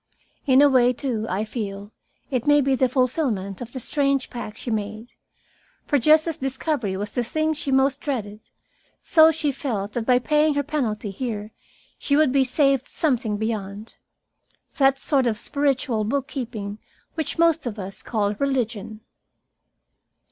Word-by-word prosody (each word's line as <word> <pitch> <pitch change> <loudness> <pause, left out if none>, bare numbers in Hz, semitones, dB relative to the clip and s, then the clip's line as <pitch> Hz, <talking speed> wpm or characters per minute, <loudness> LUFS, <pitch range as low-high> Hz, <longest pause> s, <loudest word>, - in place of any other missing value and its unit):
In 265 +1 +6
a - - +7
way, 250 -2 +4
too, 235 -4 -3
I 195 +4 -1
feel, 205 -2 -6 0.4
it 255 0 -1
may 290 0 +6
be 275 -1 +2
the 260 0 +2
fulfilment 245 - -1
of 245 0 -7
that 260 - -6
strange 275 0 0
pact 235 -3 -7
she 240 - -5
made. 215 +2 -4 0.8
For 290 - +2
just 310 +5 +5
as 325 - -2
discovery 265 -6 -2
was 205 +2 -4
the 245 - -1
thing 310 +6 0
she 290 -2 -4
most 265 +1 +2
dreaded, 215 -7 -4 0.6
so 315 -1 +6
she 315 -2 0
felt 215 -7 -4
that 235 -2 -3
by 250 -1 +5
paying 300 +3 +2
her 285 - +1
penalty 235 -8 -2
here 215 -1 -5 0.5
she 280 - +1
would 300 -3 +4
be 270 0 +4
saved 275 0 +2
something 245 -9 0
beyond 215 -1 -4 0.9
that 270 -1 +4
sort 270 -3 +1
of 220 -2 0
spiritual 265 -3 0
book 270 +5 -1
keeping 220 -6 -5 0.3
which 315 -3 -3
most 330 -4 +3
of 220 -2 -5
us 195 -1 -6
call 210 -3 -1
religion. 230 -6 -2
255 Hz, 160 wpm, -23 LUFS, 215-280 Hz, 0.9 s, a